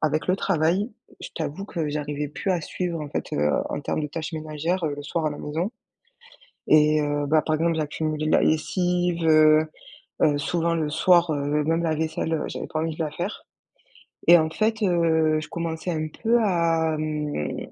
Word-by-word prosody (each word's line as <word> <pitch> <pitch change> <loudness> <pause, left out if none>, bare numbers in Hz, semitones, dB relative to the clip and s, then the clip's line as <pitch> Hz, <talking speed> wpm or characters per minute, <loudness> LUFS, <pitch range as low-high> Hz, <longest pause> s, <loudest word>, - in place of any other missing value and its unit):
avec 155 0 0
le 185 - +4
travail, 190 +4 +1 0.3
je - - -7
t'avoue 195 +8 -4
que 160 -6 -3
j'arrivais 145 0 -3
plus 160 +6 -3
à 175 -4 0
suivre, 175 -1 -3
en 145 - -7
fait, - - -4
heu, 75 0 +2 0.2
en - - -4
termes - - -2
de 150 - -2
tâches 160 +3 -5
ménagères, 155 +3 -2
heu, 150 -2 -1
le 145 - -6
soir 160 +2 -2
à 150 - +1
la 145 - -6
maison. 165 +9 -3 1.0
Et 155 0 +5
heu, 145 0 -1
bah, 155 +2 +3
par 155 - 0
exemple, 165 +1 +1
j'accumulais 155 0 -2
la - - +4
lessive, 175 +2 +1
heu 155 0 +6 0.6
heu, 145 -1 +4
souvent 170 +3 0
le 155 -2 -1
soir, 170 +2 +4
heu, 145 0 0
même 165 +2 +1
la 160 -2 0
vaisselle 160 +1 -2
heu, 160 - -1
j'avais - - -5
pas 155 - -3
envie 160 -1 -2
de 165 - -1
la 150 - -3
faire. 175 +7 -5 0.8
Et 175 0 +10
en 160 -1 0
fait, 220 +4 0
heu, 160 -4 +2
je 155 - -8
commençais 165 +1 -4
un 155 -2 -2 0.2
peu 235 +1 +4
à, 165 -4 +1
hem, 150 - -3
160 Hz, 195 wpm, -24 LUFS, 150-170 Hz, 1.0 s, Et